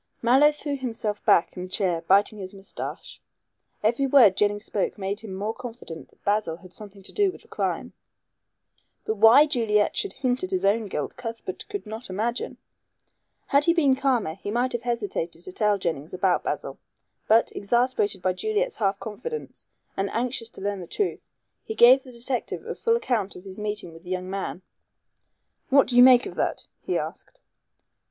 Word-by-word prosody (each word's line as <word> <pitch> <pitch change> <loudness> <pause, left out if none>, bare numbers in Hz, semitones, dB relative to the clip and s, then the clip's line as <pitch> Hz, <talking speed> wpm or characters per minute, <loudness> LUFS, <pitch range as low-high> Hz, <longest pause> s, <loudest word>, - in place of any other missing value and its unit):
Mallow 265 +6 +6
threw 295 -1 -4
himself 225 -5 -3
back 170 - +4
in 180 - -6
his 185 0 -7
chair 180 -5 0
biting 200 +4 +3
his 190 0 -8
moustache. 195 0 -7 0.6
Every 240 +6 +2
word 245 -8 +6
Jennings 205 +1 +1
spoke 205 - -1
made 200 +1 -3
him 220 -3 -9
more 205 +4 -3
confident 230 -10 -9
that - - -29
Basil 205 -5 0
had 185 +1 -15
something 200 -2 -10
to - - -7
do 405 -2 +2
with - - -14
the - - -20
crime. - - -3 1.1
But 220 - -1
why 225 +8 +8
Juliet 225 -8 +1
should 400 - -1
hint 255 0 -1
at 370 - -2
his 375 -1 0
own 210 +2 +2
guilt 150 -6 -4
Cuthbert 230 -6 -6
could 405 - -5
not 220 +2 -7
imagine. 225 +6 -2 0.9
Had 280 +1 +3
he 335 - +4
been 285 -6 +4
calmer 260 - +1
he 195 +3 -7
might 245 +4 0
have 240 - -2
hesitated 205 -8 -3
to 185 - -7
tell 210 +2 +2
Jennings 165 -4 -3
about 185 -1 +1
Basil. - - -4 0.5
But, 225 +2 +4
exasperated 210 -3 +1
by 185 - +2
Juliet's 435 - -1
half 195 -2 0
confidence, 450 - -7 0.3
and 195 0 -1
anxious 235 0 -2
to - - -10
learn 200 -1 -2
the 175 - -8
truth, 410 - -1 0.4
he 440 - -6
gave 255 - +7
the 260 - -13
detective 245 +1 -3
a - - -4
full 460 0 +1
account 230 - -1
of 180 - -11
his 190 0 -6
meeting 210 -4 -4
with 165 +1 -14
the 180 - -11
young 185 0 -3
man. 195 -1 -4 1.1
"What 275 0 +6
do 245 - -3
you 245 - +8
make 250 -1 +8
of - - -6
that?" - - -1 0.2
he - - -1
asked. - - -6
220 Hz, 185 wpm, -25 LUFS, 195-255 Hz, 1.1 s, why